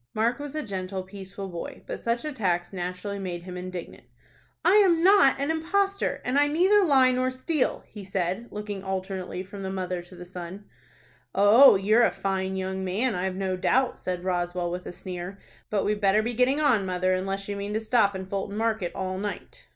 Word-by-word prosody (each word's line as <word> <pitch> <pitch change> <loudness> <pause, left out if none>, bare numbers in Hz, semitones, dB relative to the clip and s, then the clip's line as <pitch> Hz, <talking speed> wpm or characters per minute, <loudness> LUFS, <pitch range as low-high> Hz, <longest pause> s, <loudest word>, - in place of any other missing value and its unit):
Mark 235 +4 +1
was 290 0 -6
a 305 - -2
gentle, 190 -3 -4
peaceful 195 0 -8
boy, 170 -2 -7
but - - -5
such 235 +4 -1
attacks 190 - -1
naturally 180 +2 -4
made 175 -3 -5
him 180 0 -8
indignant. 180 -1 -7 0.6
"I 375 +4 +6
am 350 -5 +4
not 375 -9 +6
an 280 +3 0
impostor, 395 +5 0
and 255 +3 +2
I 290 - +4
neither 375 +7 +4
lie 265 -6 +5
nor 255 0 +1
steal," 260 +3 -1
he 210 - -10
said, 190 +3 -2
looking 210 -2 -6
alternately 190 -1 -4
from 195 +1 -9
the 190 - -3
mother 185 -2 -3
to 175 +1 -14
the 180 0 -9
son. 180 +2 -8 0.7
"Oh, 210 +7 +8
you're 210 +5 +4
a 235 - +5
fine 190 -1 -2
young 190 0 -3
man. 210 +7 0
I've 185 0 -2
no 190 -1 -1
doubt," 255 +7 +1
said 180 -1 -4
Roswell, 175 -1 -1
with 180 +1 -5
a - - -5
sneer. 180 +1 -7 0.3
"But 205 -2 0
we'd 210 0 0
better 200 +2 +4
be 240 +2 -2
getting 255 +5 +2
on, 255 -9 +3
mother, 185 0 0
unless 195 +1 -2
you 205 - -3
mean 200 +1 -4
to - - +2
stop 220 -3 +2
in 190 0 -5
Fulton 200 +1 -4
Market 220 -5 -1
all 185 0 -3
night." 205 +1 -6
195 Hz, 195 wpm, -26 LUFS, 185-245 Hz, 0.7 s, Oh